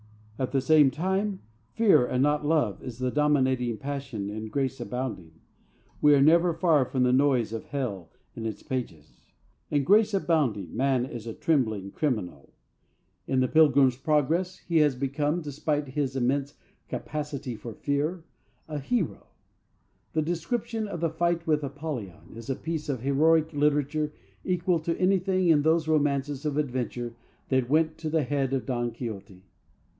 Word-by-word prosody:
At 130 -1 -1
the 135 -1 +1
same 150 +1 +5
time, 190 - -1 0.3
fear 220 - +5
and 125 +1 +1
not 150 +1 +2
love 145 - +1
is 120 -3 -7
the 130 0 -1
dominating 130 -5 +1
passion 135 -8 -5
in 110 +1 -5
Grace 135 +3 -2
Abounding. 125 -10 -5 0.7
We 150 -1 +6
are 140 - +4
never 170 +2 +4
far 160 -6 +3
from 130 0 0
the 125 0 +3
noise 130 -5 +2
of 115 - -5
Hell 110 - -4 0.3
in 115 -1 -4
its 110 - -6
pages. 85 - -6 0.4
In 145 -1 +1
Grace 210 +6 +4
Abounding 135 - 0
man 130 -2 +1
is 115 -3 -8
a 115 - -5
trembling 110 -11 0
criminal. 95 - -3 0.8
In 130 -1 +2
The 130 - +2
Pilgrim's 140 -4 +5
Progress 155 +6 0
he 170 -1 +2
has 150 -4 +4
become, 145 +5 -1
despite 145 -1 -2
his 135 -1 -2
immense 135 +3 0 0.3
capacity 145 -4 -4
for 110 +1 -8
fear, 150 +5 -1 0.4
a 150 -2 -4
hero. 185 - -2 0.9
The 155 0 +1
description 215 +7 -2
of 175 -5 -6
the 165 -2 +1
fight 170 +1 0
with 150 -2 +1
Apollyon 140 - -6
is 115 +1 -9
a 135 - 0
piece 160 0 -4
of 130 -5 -2
heroic 155 +4 +3
literature 150 +1 +1 0.3
equal 180 -1 +1
to 165 +1 -2
anything 185 -1 +2
in 155 -3 +5
those 160 +1 +2
romances 145 -2 0
of 150 -2 -2
adventure 125 -4 -2 0.4
that 130 -2 +1
went 155 +2 +2
to 160 -1 -3
the 160 -1 +1
head 135 0 -1
of 130 -5 -1
Don 120 -1 -1
Quixote. 105 -5 -8
145 Hz, 160 wpm, -27 LUFS, 125-160 Hz, 0.9 s, We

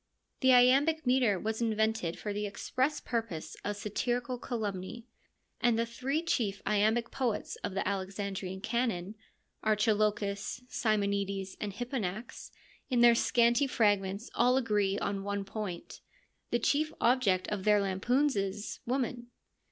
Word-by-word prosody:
The 260 - +5
iambic 275 +5 +5
metre 250 -6 +3
was 220 +3 -3
invented 220 -5 0
for 210 - -4
the 205 0 -2
express 260 +8 -1
purpose 215 -10 -4
of 205 - -2
satirical 240 +4 -2
calumny, 215 -1 -4 0.5
and 240 -2 +3
the 230 - +1
three 265 +7 -2
chief 210 - 0
iambic 215 +3 +2
poets 245 -5 -2
of 195 - -5
the 195 - -1
Alexandrian 195 -1 -3
canon, 220 -5 -1 0.5
Archilochus, 210 +1 +1
Simonides, 200 -4 -1
and 210 - -2
Hipponax, 230 -2 -4 0.4
in 245 -3 +2
their 240 0 +8
scanty 235 +3 +3
fragments 205 -3 +1
all 250 +2 +3
agree 205 -5 +1
on 200 -1 -2
one 200 0 -3
point: 195 -4 -6 0.5
the 240 - +2
chief 295 +6 +1
object 230 -7 +2
of 205 -2 -3
their 210 0 +5
lampoons 240 +9 +1
is 200 +1 -3
— - - -45
woman. 245 -1 -2
215 Hz, 135 wpm, -31 LUFS, 200-245 Hz, 0.5 s, their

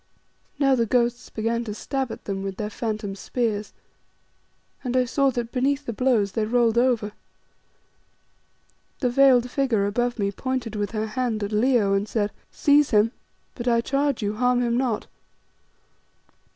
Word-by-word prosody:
Now 275 -2 +3
the 235 -3 +2
ghosts 240 +1 0
began 230 +2 -1
to 210 -2 -5
stab 265 +2 -3
at - - -9
them 195 -1 -3
with 195 -1 -5
their 210 0 -4
phantom 215 -3 -3
spears, 210 0 -2 1.1
and 255 -1 -1
I 255 - +3
saw 275 +3 +2
that 240 -2 -3
beneath 275 +3 0
the 235 - -3
blows 225 -5 +2
they 220 - -1
rolled 235 0 +3
over. 240 -4 +1 1.9
The 250 -3 +1
veiled 250 -2 +5
figure 245 -8 +1
above 240 +4 -1
me 200 -2 0
pointed 250 0 -3
with 205 -1 -1
her 215 0 -1
hand 220 -1 -2
at 205 - -3
Leo 215 -2 +3
and 195 +1 0
said 210 -2 0 0.2
"Seize 290 0 +3
him, 215 +1 +3 0.4
but 240 -1 -6
I 235 -1 +4
charge 275 -1 0
you, 205 +1 -2
harm 250 +1 +2
him 235 -1 +1
not." 245 -4 0
235 Hz, 160 wpm, -24 LUFS, 215-255 Hz, 1.9 s, veiled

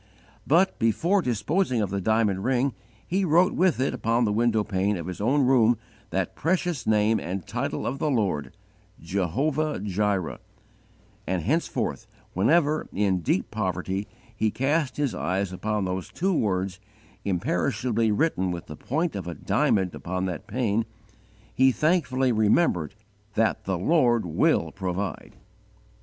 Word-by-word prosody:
But, 175 +6 +3
before 165 - +2
disposing 130 - 0
of 100 -3 -1
the 100 0 -1
diamond 105 -2 +1
ring, 130 +1 +1 0.3
he 190 +3 0
wrote 175 +2 +4
with 180 -7 +2
it 130 - +1
upon 115 +2 +1
the 105 - 0
window 110 -1 +2
pane 100 0 0
of 85 - -6
his 90 +2 -6
own 135 +5 +3
room 120 -3 +4 0.3
that 95 -2 -1
precious 170 -5 -1
name 110 +1 +3
and 90 +1 -4
title - - -3
of 135 +3 -2
the 155 - 0
Lord 100 - 0 0.5
"JEHOVAH 130 - -1
JIREH" 100 -2 -1 0.9
and 90 -2 -1
henceforth 160 - -1 0.3
whenever, 155 - +2
in 95 -2 +1
deep 90 +2 -1
poverty, 95 -1 -2 0.3
he 110 0 +1
cast 140 +4 0
his 145 -4 0
eyes 95 +1 -2
upon 105 +1 -1
those 90 -1 -3
two 190 +2 0
words, 95 - -1 0.4
imperishably 110 +5 0
written 105 - +1
with 85 0 -4
the 75 - -8
point 155 - -2
of 95 -3 -5
a 85 - -4
diamond 95 -3 +1
upon 90 +1 -3
that 90 -3 -5
pane, 115 -3 0 0.7
he 130 0 +5
thankfully 135 -4 +1
remembered 105 - +2 0.4
that 115 0 +1
"THE 95 -1 -1
LORD 120 - +3
WILL 80 -1 +1
PROVIDE." 95 +1 -4
110 Hz, 145 wpm, -26 LUFS, 95-135 Hz, 0.9 s, he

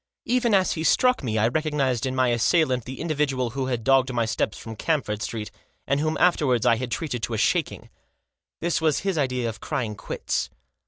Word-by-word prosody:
Even 240 -3 +2
as 190 -1 +3
he 160 - -2
struck 250 +8 +3
me 110 -3 -1
I 110 +1 +3
recog 155 +5 -1
nised 130 -4 0
in 130 - -3
my 130 -1 +3
assailant 125 +1 +2
the 130 +1 -7
individual 140 -6 -1
who 130 +1 -3
had 120 -3 -2
dogged 135 0 +3
my 120 -2 0
steps 110 -1 -1
from 115 -1 -8
Camford 110 -6 -1
Street, 105 -1 -4 0.3
and 140 +1 +1
whom 155 +1 0
afterwards 145 -10 +3
I 115 - +4
had 130 +1 -4
treated 125 -3 -3
to 115 - -2
a - - -2
shaking. - - 0 0.7
This 170 -1 0
was 155 -3 +2
his 195 -2 -1
idea 125 -3 0
of 110 - -5
crying 110 -4 -3
quits. 100 - -3
130 Hz, 205 wpm, -24 LUFS, 115-155 Hz, 0.7 s, I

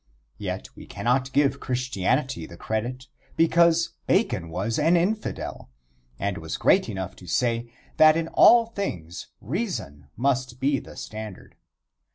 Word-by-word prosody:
Yet - - -4
we - - -12
cannot 130 +2 0
give 140 0 +2
Christianity 125 - -1
the 85 - -12
credit, 120 +6 -3 0.3
because 165 0 +4 0.2
Bacon 85 - +1
was 100 - -2
an 165 +4 +4
infidel, 205 - -2 0.5
and 100 +3 -2
was 80 0 -5
great - - +3
enough 95 -1 -5
to 90 - -13
say 115 +4 0 0.3
that 155 0 +7
in 165 0 -1
all 235 -1 +7
things 90 - -5
reason 120 - -4
must 130 -1 0
be 135 +1 +1
the - - -13
standard. 110 -3 -8
125 Hz, 135 wpm, -25 LUFS, 100-155 Hz, 0.5 s, that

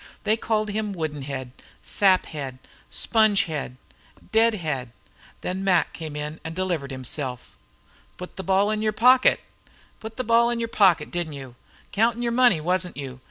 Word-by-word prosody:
They 215 +1 +3
called 215 -2 -1
him 210 -1 -2
"wooden 155 -5 -4
head," 130 -2 -5 0.3
"sap 190 -2 +3
head," 135 -5 -6 0.3
"sponge 220 -2 +3
head," 150 - -5 0.5
"dead 225 0 +4
head." 135 - -4 0.5
Then 185 +1 -3
Mac 180 -3 +2
came 155 -3 -7
in 150 +1 -5
and 160 0 -6
delivered 175 -7 -2
himself. 130 -1 -5 0.6
"Put 180 - -9
the - - -5
ball 195 +3 +2
in 215 0 -1
your 215 0 +1
pocket! 255 +4 +5 0.6
Put 220 +2 -9
the 255 - -1
ball 235 +1 +4
in 240 - -1
your 230 0 -2
pocket, 185 -9 +3
didn't 170 -3 -3
you? 135 -3 -9 0.4
Countin' 230 +3 +1
your 235 - 0
money, 240 -7 +4
wasn't 180 +2 -1
you? 130 -3 -7
185 Hz, 165 wpm, -24 LUFS, 150-220 Hz, 0.6 s, pocket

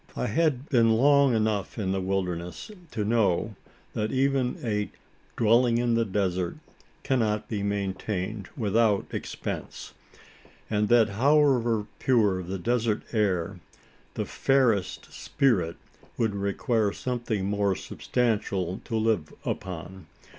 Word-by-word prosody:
I - - -1
had 145 +1 +1
been 115 -3 +4
long 140 0 +5
enough 110 -1 -1
in 95 -4 -1
the 95 0 -1
wilderness, 90 - -3 0.2
to 105 -6 -3
know 110 -2 +1 0.4
that 110 0 -1
even 135 -1 +1
a 105 -3 -1 0.5
"dwelling 115 +1 +4
in 120 0 +1
the 115 0 +2
desert" 95 -3 -1 0.5
cannot 110 -5 0
be 105 -3 -3
maintained 100 0 -3
without 110 -2 +2
expense; - - -5 0.8
and 105 0 +1
that 120 -2 +5
however 120 -2 +3
pure 105 -7 +2
the 95 +2 -4
desert 115 +2 0
air, 100 -4 0 0.6
the - - -2
fairest 125 -8 +1
"spirit" 100 - +1 0.4
would 110 -3 +1
require 100 +2 0
something 120 -6 -3
more 100 -1 +1
substantial 100 -8 -1
to 115 - -3
live 110 -8 +1
upon. 90 -1 -5
110 Hz, 120 wpm, -27 LUFS, 95-120 Hz, 0.8 s, long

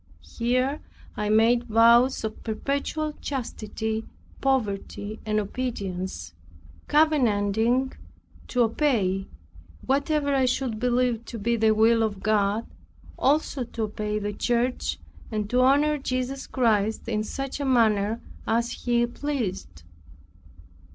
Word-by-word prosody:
Here 255 +5 0 0.3
I 210 0 -2
made 230 +3 +4
vows 235 +3 +5
of 220 0 -5
perpetual 280 +6 -2
chastity, 220 -4 -3 0.4
poverty 215 -4 -1
and 215 0 +2
obedience, 200 -4 -4 0.5
covenanting 250 -4 +2 0.5
to 250 - 0
obey 220 -6 +1 0.6
whatever 285 +1 +1
I 265 -1 +3
should 250 -3 -1
believe 245 -1 +1
to 230 - -7
be 235 +3 0
the 220 -1 +3
will 225 +1 +4
of 210 -3 -2
God 210 +1 +1 0.5
also 285 -1 +1
to 230 -1 -5
obey 210 0 -2
the 205 0 -3
church, 240 +3 0 0.3
and 215 -2 -2
to 250 +1 +3
honor 290 +3 +4
Jesus 260 0 -3
Christ 220 -4 +1
in 215 -2 0
such 270 +5 -5
a - - -2
manner 225 -4 +2 0.3
as 235 +1 +1
He 240 -1 +1
pleased. 235 - -4
235 Hz, 115 wpm, -25 LUFS, 215-260 Hz, 0.6 s, vows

